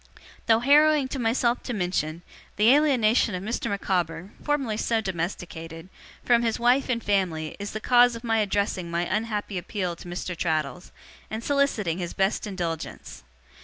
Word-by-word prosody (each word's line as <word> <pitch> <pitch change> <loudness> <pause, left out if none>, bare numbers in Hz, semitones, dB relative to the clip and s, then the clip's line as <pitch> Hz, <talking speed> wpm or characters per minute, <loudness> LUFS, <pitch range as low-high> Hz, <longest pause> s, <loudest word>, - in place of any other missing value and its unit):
'Though 225 0 +4
harrowing 295 +1 +5
to 270 - -4
myself 235 +1 +1
to 245 - -4
mention, 175 -3 -2 0.3
the 220 +5 +5
alienation 245 -8 +3
of 180 - -5
Mr. 235 +1 -2
Micawber 180 -2 -2
(formerly 275 -7 -1
so 225 +1 0
domesticated) 170 -3 -5 0.4
from 240 -1 +4
his 230 -2 0
wife 245 +3 +3
and 235 -2 -1
family, 175 -6 0
is 205 0 -4
the 215 - -3
cause 245 +1 +4
of 230 - -9
my 225 -2 +1
addressing 200 -3 -1
my 170 +1 -1
unhappy 210 -1 -2
appeal 180 -1 -3
to - - -11
Mr. 175 +1 -4
Traddles, 160 0 -2 0.4
and 220 +1 -5
soliciting 230 - 0
his 175 -2 -5
best 195 +2 0
indulgence. 175 -5 -5
205 Hz, 160 wpm, -26 LUFS, 175-235 Hz, 0.4 s, harrowing